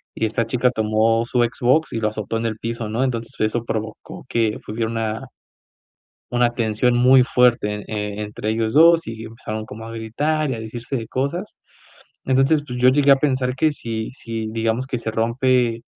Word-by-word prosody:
y 110 - 0
esta 115 +2 0
chica 125 +2 +2
tomó 110 0 +1
su 120 0 +2
Xbox 125 +6 +1
y 115 - -1
lo 110 -1 +1
azotó 110 +1 -4
en 115 0 -1
el 110 -1 -4
piso, 115 -1 -4
¿no? 115 +4 0
Entonces 115 -3 -3
eso 110 +2 0
provocó 110 -1 -5
que 115 -3 0
hubiera 110 +1 -2
una 115 +1 -3 1.1
una 120 -1 +2
tensión 115 +1 +1
muy 125 +1 +6
fuerte, 120 -5 +2
eh, 105 -1 -4
entre 105 0 -4
ellos 110 +1 -1
2 165 +2 +6
y 110 0 -6
empezaron 110 -1 -6
como 110 +2 -9
a 115 - -8
gritar, 145 +7 -1
y - - -1
a 115 - -6
decirse 115 +4 -5
de 115 -3 -4
cosas. 155 +10 -3 0.7
Entonces, 135 +3 +3
pues 125 -2 -5
yo 125 +1 +5
llegué 140 +2 +4
a - - +6
pensar 130 -2 0
que 155 +3 +2
si 115 -5 -5
si, 115 -1 -4
digamos, 115 +3 -1
que 130 -2 -3
se 110 - -3
rompe, 115 +1 +1
115 Hz, 190 wpm, -21 LUFS, 110-130 Hz, 1.1 s, muy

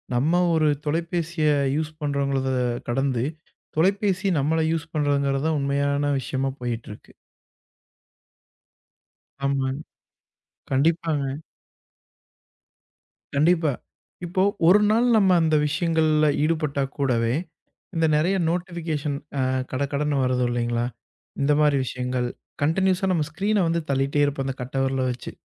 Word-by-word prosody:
நம்ம 160 +8 +2
ஒரு 160 -1 +3 0.2
தொலைபேசிய 165 +1 -1 0.3
யூஸ் 155 0 -2
பண்றோங்கறத 140 -2 0 0.4
கடந்து, 130 -1 0 0.5
தொலைபேசி 195 +2 +2
நம்மள 155 +4 +1
யூஸ் 165 0 -3
பண்றங்கிறதான் 145 +1 +1
உண்மையான 140 +1 0
விஷயமா 135 +1 -2
போயிட்டு 120 -2 -4
இருக்கு. 105 - -13 2.3
ஆமா. 135 -1 0 1.0
கண்டிப்பாங்க. 150 -1 0 1.9
கண்டிப்பா. 160 +1 +3 0.5
இப்போ, 185 +2 0 0.2
ஒரு 190 +4 +7
நாள் 235 +3 +3
நம்ம 195 -3 +4
அந்த 160 -1 +2
விஷயங்கள்ல 155 -1 +2 0.2
ஈடுபட்டா 155 -3 0
கூடவே, 120 -4 +1 0.6
இந்த 165 0 +2
நிறைய 170 +6 +2
நோட்டிபிகேஷன் 165 -5 -2 0.2
அ - - +2 0.3
கடகடன்னு 140 +2 -1
வருது 125 -1 +1
இல்லைங்களா? 120 0 -1 0.6
இந்த 140 +1 +2
மாதிரி 150 -2 +4
விஷயங்கள் 125 0 -2 0.4
கண்டினியூயஸா 190 +4 +2
நம்ம 160 -4 +1
ஸ்கிரீன 200 +3 +1
வந்து 165 0 0
தள்ளிட்டே 140 +2 +1
இருப்போம் 140 -1 -2
அந்தக் 130 -1 -5
கட்டவிரல 135 +1 -1
வச்சு. 125 - -7
150 Hz, 105 wpm, -24 LUFS, 135-165 Hz, 2.3 s, ஒரு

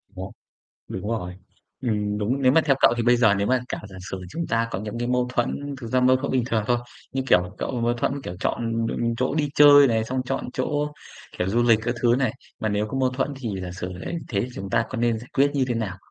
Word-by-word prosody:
Nó, 95 - -5 0.7
đúng 95 +3 -5
rồi, 90 -6 -3 0.5
ừm, 105 -3 -1
đúng, 125 +7 -1
nếu 130 0 +5
mà 160 - +6
theo 135 -2 +3
cậu - - +6
thì 120 - 0
bây 120 +1 +4
giờ 110 -4 +4
nếu 100 +1 0
mà 130 0 +2
cả - - -3
giả 95 - -12
sử 95 - -4
chúng 170 0 -3
ta 115 +1 0
có 95 - -3
những, 110 +2 -5
cái, 120 +1 -2
mâu 125 0 +1
thuẫn, 140 +4 -1
thực 115 - -6
ra 130 +2 +2
mâu 130 +1 +5
thuẫn 140 +1 -3
bình 130 -2 +2
thường 110 -4 0
thôi, 120 -1 +2 0.3
như, 135 0 -1
kiểu, 90 -2 +3
cậu 125 -3 -2
mâu 120 +1 +2
thuẫn, 120 - 0
kiểu, 90 - -6
chọn, 115 -1 -1
ừm, 115 0 -1
chỗ 130 +4 0
đi 150 -2 +1
chơi 145 -1 +8
này, 110 -2 +1
xong 130 +2 -2
chọn 135 +2 -2
chỗ, 150 +3 -1 0.5
kiểu, 90 - 0
du 120 +4 +2
lịch 115 -2 +5
các 120 +1 -1
thứ 120 0 +5
này, 130 - +1 0.3
mà 110 - 0
nếu 105 +1 0
có 135 - -4
mâu 130 -1 +3
thuẫn 130 +2 -1
thì 125 -4 -5
giả 90 - -5
sử 90 0 -5
đấy 170 - -5
thế, 100 -4 0
thì 125 - -2
chúng 95 0 -6
ta 115 - +2
có - - -5
nên 120 -1 +1
giải 125 - -12
quyết 140 +1 +3
như 135 -2 +2
thế 120 - 0
nào? 105 -5 -3
120 Hz, 270 wpm, -24 LUFS, 105-130 Hz, 0.7 s, chơi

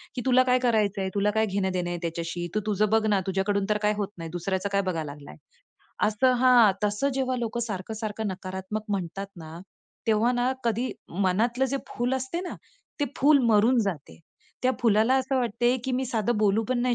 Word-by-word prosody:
की 250 - -2
"तुला 255 0 +5
काय 255 0 +3
करायचंय? 210 -5 +1
तुला 205 +1 +2
काय 220 +1 +2
घेणं 195 -2 -1
देणं 180 -1 -2
आहे 175 - -3
त्याच्याशी? 170 +1 -3
तू - - +3
तुझं 210 0 +1
बघ 220 +1 +2
ना. 205 -2 +3
तुझ्याकडून 195 +1 0
तर 210 - +2
काय 210 0 +2
होत 205 -2 -1
नाही, 165 -1 -6
दुसऱ्याचं 185 +3 -2
काय 200 0 +2
बघायला 165 -6 -3
लागलाय." 145 - -12 0.7
असं 220 +5 +3
हां, 245 -5 +6
तसं 210 +7 +1
जेव्हा 260 -1 0
लोकं 235 0 -3
सारखं-सारखं 220 0 -4
नकारात्मक 190 +2 -5
म्हणतात 195 -1 -3
ना, 160 0 -9 0.5
तेव्हा 225 +2 +3
ना 245 +1 +1
कधी 235 +2 0 0.2
मनातलं 205 +8 +1
जे 275 - 0
फुल 245 +2 -1
असते 260 +6 -3
ना, 365 - -5 0.5
ते - - +3
फूल 285 +2 +5
मरून 225 +4 +4
जाते. 175 -8 -5 0.4
त्या 255 - +3
फुलाला 225 +2 +3
असं 265 0 +1
वाटते, 240 +1 +1
की 260 - -2
मी 255 +1 0
साधं 230 -1 0
बोलू 215 +1 +3
पण 255 -1 +1
नाही 250 -1 +2
215 Hz, 190 wpm, -26 LUFS, 190-245 Hz, 0.7 s, हां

